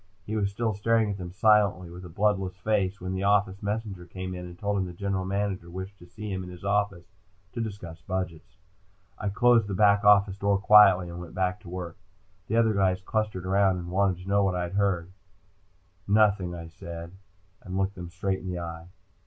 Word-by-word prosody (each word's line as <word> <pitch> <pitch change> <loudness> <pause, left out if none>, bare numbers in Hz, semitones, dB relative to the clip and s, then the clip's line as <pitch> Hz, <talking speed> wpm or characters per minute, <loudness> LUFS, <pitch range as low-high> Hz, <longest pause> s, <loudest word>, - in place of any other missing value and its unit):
He 110 - -4
was 100 -2 +1
still 110 +2 -1
staring 110 +1 +1
at 100 - -6
them 90 -1 -6
silently, 100 -3 +3
with 90 +1 -10
a 90 - -9
bloodless 95 0 0
face, 100 -1 0
when 95 +1 -4
the 95 - -2
office 100 -1 +2
messenger 100 -4 -4
came 95 +1 -6
in 90 0 -6
and 85 0 -11
told 100 +1 -1
him 95 - 0
the 90 - -8
General 95 +1 -2
Manager 95 -2 -2
wished 95 +2 -7
to 85 - -14
see 105 +3 -7
him 95 0 -3
in 90 - -8
his 90 +1 -10
office 100 -3 0 0.5
to 120 - -3
discuss 100 -7 -6
budgets. 90 -4 -5 0.6
I 105 - -1
closed 115 +1 +4
the 100 - -3
back 100 +1 +4
office 100 -1 +5
door 100 0 +2
quietly 100 -3 +6
and 85 0 -7
went 85 - -10
back 90 0 0
to 90 - -12
work. 90 -2 -6 0.5
The 110 - -1
other 115 -1 +4
guys 95 -2 +2
clustered 105 -3 -2
around 95 0 +3
and 85 0 -6
wanted 95 -1 +1
to - - -12
know 100 0 +3
what 95 -2 +1
I 90 -1 -2
heard. 95 -3 0 1.0
"Nothing," 100 -4 +3
I 85 -1 -7
said, 85 0 -9 0.5
and 95 +1 -5
looked 95 0 0
them 90 -2 -8
straight 95 +2 -2
in 95 - -9
the 90 -1 -3
eye. 85 -1 -6
95 Hz, 210 wpm, -27 LUFS, 90-100 Hz, 1.0 s, quietly